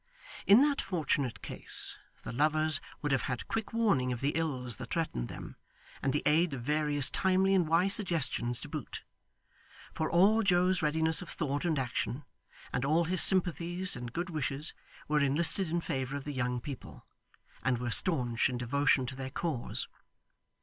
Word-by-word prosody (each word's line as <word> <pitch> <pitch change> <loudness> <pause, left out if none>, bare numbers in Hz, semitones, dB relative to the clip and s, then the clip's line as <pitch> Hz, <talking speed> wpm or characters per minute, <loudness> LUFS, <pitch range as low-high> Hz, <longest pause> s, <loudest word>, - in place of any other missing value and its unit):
In 205 +6 +8
that 290 -1 +1
fortunate 150 - -2
case, - - +1 0.2
the - - -6
lovers 155 +4 +1 0.2
would 145 - 0
have 135 - +2
had 125 -2 -4
quick 225 -1 -3
warning 200 - +1
of 120 - -3
the 140 +3 0
ills 130 -8 -2
that 125 -2 -8
threatened 110 - -2
them, - - -9 0.4
and 135 - 0
the 145 - -1
aid 155 0 +3
of 120 - -7
various 150 0 +1
timely 190 0 +2
and 180 -4 +3
wise 175 +5 +3
suggestions 155 - +1
to - - -6
boot; 150 -4 -6 0.9
for 160 - -2
all 200 +6 +4
Joe's 185 -2 +2
readiness 160 +2 +2
of 180 - -8
thought 145 0 -2
and 160 -3 +1
action, 130 +1 -2 0.5
and 125 - -1
all 160 +5 +2
his 180 +2 0
sympathies 180 0 +2
and 120 -1 -6
good 175 +6 -4
wishes, 150 -1 -1 0.3
were 150 0 +2
enlisted 160 +6 +2
in 170 +1 -1
favour 135 -2 -3
of 140 - -7
the 145 - -5
young 125 -1 -1
people, 135 0 -9 0.6
and 130 -1 +1
were 120 0 -3
staunch 125 -7 +2
in 125 - -3
devotion 130 +2 +1
to 130 +1 -6
their 130 0 -5
cause. 145 -3 -1
150 Hz, 170 wpm, -31 LUFS, 130-175 Hz, 0.9 s, In